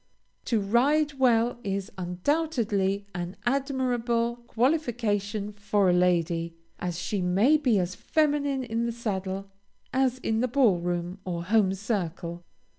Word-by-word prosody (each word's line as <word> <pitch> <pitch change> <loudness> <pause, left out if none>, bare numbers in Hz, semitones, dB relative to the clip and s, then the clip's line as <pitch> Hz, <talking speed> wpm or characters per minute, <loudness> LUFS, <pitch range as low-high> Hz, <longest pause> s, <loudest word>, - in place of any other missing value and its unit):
To 230 - +1
ride 275 +8 +2
well 240 -2 +3
is 200 0 -3
undoubtedly 200 - 0
an 175 0 -4
admirable 245 -3 0
qualification 220 -6 0
for 200 -2 +2
a - - +3
lady, 170 -2 +1 0.2
as 175 -2 -3
she 190 +2 -2
may 195 +11 +4
be 260 -8 +2
as 180 -1 0
feminine 285 +4 0
in 230 0 -1
the - - -1
saddle 195 -4 -4 0.4
as 260 -1 +2
in 220 -3 -1
the 250 - +2
ball 240 -8 +3
room 175 +2 -3
or 175 -3 -3
home 195 0 +3
circle. 180 -4 -3
210 Hz, 130 wpm, -27 LUFS, 185-250 Hz, 0.4 s, may